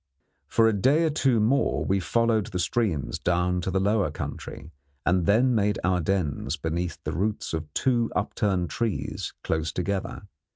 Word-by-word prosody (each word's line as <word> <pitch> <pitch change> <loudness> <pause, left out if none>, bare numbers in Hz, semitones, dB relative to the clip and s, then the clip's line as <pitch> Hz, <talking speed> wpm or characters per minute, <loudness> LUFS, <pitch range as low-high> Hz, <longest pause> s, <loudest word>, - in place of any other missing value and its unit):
For 115 - +4
a 110 - +3
day 135 - +3
or 160 - +2
two 135 -5 +2
more 125 +7 +2
we 95 +1 +1
followed 115 +2 +1
the 95 -5 -4
streams 90 - -1
down 90 0 +1
to 90 - -2
the 95 +1 +1
lower 100 +1 +2
country, - - -7 0.3
and 90 0 +2
then 120 +5 +4
made 105 -2 +1
our 90 -1 +2
dens 80 -5 -1
beneath 85 +2 -3
the - - -3
roots 105 +2 -2
of 80 -2 -4
two 120 -3 +2
upturned 100 -4 0
trees 115 -4 -3
close 80 -1 -1
together. 95 +2 -3
100 Hz, 165 wpm, -26 LUFS, 90-115 Hz, 0.3 s, For